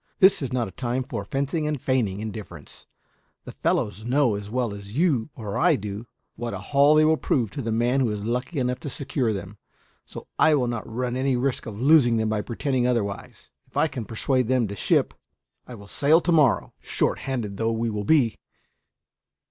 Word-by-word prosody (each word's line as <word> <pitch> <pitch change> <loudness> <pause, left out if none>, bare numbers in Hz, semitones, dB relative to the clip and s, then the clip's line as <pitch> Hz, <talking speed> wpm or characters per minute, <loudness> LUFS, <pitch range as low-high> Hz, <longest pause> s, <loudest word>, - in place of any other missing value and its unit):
This 190 -4 +5
is 135 - -3
not 125 -3 0
a - - -9
time 125 +5 -2
for 100 - -5
fencing 140 +7 -2
and 150 -2 -2
feigning 115 -7 0
indifference; 105 -8 -9 0.6
the - - -9
fellows 105 0 -1
know, 125 0 +2
as 100 0 -5
well 120 -2 -1
as 100 +3 -9
you 150 -8 +2
or 105 -3 -4
I 170 -1 +4
do, 105 0 -6 0.3
what 120 0 -4
a - - -3
haul 145 +2 +3
they 155 0 +5
will 160 0 +3
prove 120 -9 0
to - - -5
the 115 - -3
man 120 +4 +1
who 125 -4 +2
is 105 -1 -4
lucky 125 +8 -3
enough 125 -1 -1
to 145 - -6
secure 130 -3 -2
them, 100 0 -6 0.4
so - - -10
I 155 -1 +5
will 130 -4 +1
not 120 -2 -4
run 125 +1 -2
any 130 0 +1
risk 130 0 -1
of 105 -2 -7
losing 130 -4 +5
them 110 -1 0
by 110 -1 0
pretending 125 +3 -1
otherwise. 105 -6 -3 0.2
If - - -11
I - - +4
can 130 -6 -6
persuade 125 +2 0
them 125 -3 +2
to 100 - -5
ship, - - +1 0.5
I 125 - -8
will 100 -2 -12
sail 145 +10 +3
to 175 - 0
morrow, 150 -8 +3
short - - -1
handed 115 -7 -4
though 115 +1 0
we 115 -1 -2
should 105 -1 -4
be. 135 -8 +3
120 Hz, 205 wpm, -24 LUFS, 110-135 Hz, 0.6 s, This